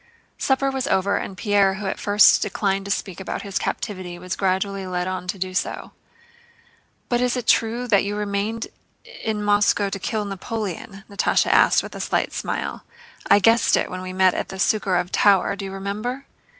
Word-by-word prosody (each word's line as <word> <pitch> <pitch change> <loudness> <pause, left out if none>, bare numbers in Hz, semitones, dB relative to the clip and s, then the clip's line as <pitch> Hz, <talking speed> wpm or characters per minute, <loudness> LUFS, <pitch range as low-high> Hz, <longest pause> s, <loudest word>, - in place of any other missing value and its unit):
Supper 270 0 +1
was 265 0 -2
over, 200 -2 +1
and 190 - -5
Pierre 200 -1 +2
who 200 +1 -6
at 190 - -3
first 205 +1 +5
declined 195 -1 -1
to - - -6
speak 190 -2 -3
about 190 - -5
his 200 -1 -2
captivity 185 -5 -4
was 180 +1 -5
gradually 195 0 -1
led 180 0 -2
on 185 -1 -4
to 190 - -3
do 185 0 -4
so. 185 - -3 1.2
"But 240 0 +1
it's 250 0 +1
true 235 +2 +2
that 205 -4 +4
you 205 +1 -3
remained 210 +2 -2 0.6
in 215 -2 -2
Moscow 205 -1 +3
to 195 - -5
kill 215 +2 -2
Napoleon?" 195 -1 -5
Natásha 200 - +1
asked - - +5
with - - -9
a - - -7
slight - - -1
smile. - - -4 0.5
"I - - +7
guessed 225 +3 +4
it - - +2
then - - -5
when 185 0 -5
we 185 0 -6
met 185 0 +3
at - - -3
the 190 - -7
Súkharev 185 -2 +1
tower, 200 -1 +3
do 200 - -6
you 195 - -6
remember?" 210 +8 -4
200 Hz, 190 wpm, -22 LUFS, 190-210 Hz, 1.2 s, I